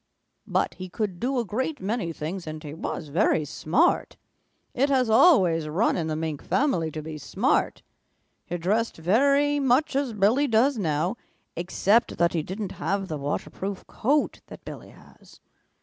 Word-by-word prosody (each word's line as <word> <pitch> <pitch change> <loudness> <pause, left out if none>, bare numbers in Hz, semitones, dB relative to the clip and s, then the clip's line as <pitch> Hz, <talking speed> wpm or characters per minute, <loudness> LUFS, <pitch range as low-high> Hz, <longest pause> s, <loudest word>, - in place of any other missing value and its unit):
But - - 0
he 185 0 -8
could 190 -2 -3
do 260 +2 -1
a 240 - 0
great 260 +9 -2
many 205 -3 -2
things, 165 +3 -5
and 155 0 -6
he 150 -1 -7
was 155 -1 -5
very 160 -1 +2
smart. 245 - +1 0.6
It 275 +3 +1
has 255 -4 +2
always 185 - +5
run 180 +10 +1
in 165 -3 -2
the 155 - -2
Mink 155 -2 -3
family 185 - +1
to 155 0 -6
be 155 -1 -7
smart. - - 0 0.6
He 175 - -3
dressed 210 +7 0
very 280 - +3
much 270 +2 +2
as 275 -4 0
Billy 220 +8 +3
does 255 +4 +3
now, 165 +4 0 0.4
except 195 +6 +1
that 170 0 +2
he 165 - 0
didn't 190 +4 -5
have 195 +4 -1
the 155 - -3
waterproof 185 +7 -4
coat 290 +6 0
that - - -12
Billy - - -9
has. - - -19
195 Hz, 165 wpm, -25 LUFS, 165-250 Hz, 0.6 s, always